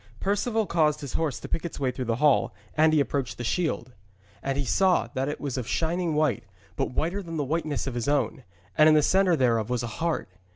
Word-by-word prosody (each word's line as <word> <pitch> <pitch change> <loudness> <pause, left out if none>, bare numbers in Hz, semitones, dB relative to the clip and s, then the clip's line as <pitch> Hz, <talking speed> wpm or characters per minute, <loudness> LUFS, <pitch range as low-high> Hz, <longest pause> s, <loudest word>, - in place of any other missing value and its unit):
Perceval 215 +3 0
caused 155 -4 +1
his 140 -3 -6
horse 150 -8 -1
to - - -8
pick 165 - -2
its 170 - -6
way 130 -2 0
through 125 0 -5
the 115 -1 0
hall, 145 +2 +2 0.2
and 155 +1 +4
he 155 - +3
approached 135 -3 -1
the 120 - -5
shield. 130 -3 -1 0.5
And 135 0 -2
he 140 - -1
saw 185 -7 +2
that 135 +2 -1
it 150 - -4
was 135 -3 -3
of 120 - -5
shining 170 0 0
white, 150 -7 +1 0.3
but - - -1
whiter 170 +9 -1
than 165 -3 -6
the 150 - 0
whiteness 155 0 -2
of 135 - -3
his 120 +1 -3
own, 145 -2 0 0.3
and 155 0 +6
in 155 - +6
the 150 - +4
centre 185 +1 +4
thereof 115 -5 +1
was 125 -1 -1
a 120 +5 -6
heart. 165 - -1
150 Hz, 235 wpm, -26 LUFS, 130-165 Hz, 0.5 s, and